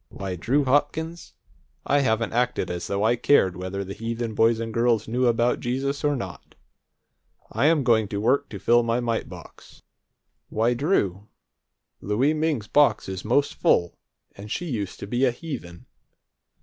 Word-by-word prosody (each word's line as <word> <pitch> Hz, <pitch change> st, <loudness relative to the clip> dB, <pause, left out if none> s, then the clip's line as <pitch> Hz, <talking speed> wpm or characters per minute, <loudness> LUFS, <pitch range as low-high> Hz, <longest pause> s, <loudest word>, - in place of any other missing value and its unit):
Why, 95 Hz, -2 st, -5 dB
Drew 135 Hz, -, +1 dB
Hopkins, 150 Hz, +5 st, -1 dB, 0.5 s
I 145 Hz, -, +3 dB
haven't 115 Hz, -4 st, 0 dB
acted 120 Hz, -6 st, 0 dB
as 90 Hz, 0 st, -4 dB
though 100 Hz, +1 st, -1 dB
I 115 Hz, +2 st, +3 dB
cared 105 Hz, -7 st, +3 dB
whether 95 Hz, +2 st, -4 dB
the 95 Hz, 0 st, -7 dB
heathen 115 Hz, +1 st, -4 dB
boys 115 Hz, +1 st, +3 dB
and 115 Hz, -1 st, -4 dB
girls 115 Hz, -2 st, +1 dB
knew 125 Hz, +2 st, +1 dB
about 120 Hz, +1 st, +2 dB
Jesus 135 Hz, +4 st, -2 dB
or 145 Hz, -1 st, +2 dB
not! 125 Hz, -, -8 dB, 1.0 s
I'm 145 Hz, +6 st, +2 dB
going 110 Hz, -4 st, +3 dB
to 100 Hz, 0 st, -4 dB
work 135 Hz, +6 st, +1 dB
to 105 Hz, -, -7 dB
fill 120 Hz, +4 st, +3 dB
my 115 Hz, +1 st, 0 dB
mite 115 Hz, -2 st, -2 dB
box. -, -, -14 dB, 0.7 s
Why, 115 Hz, +3 st, +1 dB
Drew, 110 Hz, -, 0 dB, 0.7 s
Louie 120 Hz, +9 st, +1 dB
Ming's 155 Hz, -8 st, -1 dB
box 145 Hz, 0 st, +3 dB
is 95 Hz, -1 st, -5 dB
most 135 Hz, +6 st, +1 dB
full, 85 Hz, 0 st, +1 dB, 0.4 s
and 100 Hz, +2 st, -10 dB
she 175 Hz, -, -3 dB
used 110 Hz, -, -4 dB
to -, -, -4 dB
be 120 Hz, +5 st, -1 dB
a 130 Hz, -, +5 dB
heathen!" 120 Hz, -, -8 dB
115 Hz, 160 wpm, -24 LUFS, 105-140 Hz, 1.0 s, a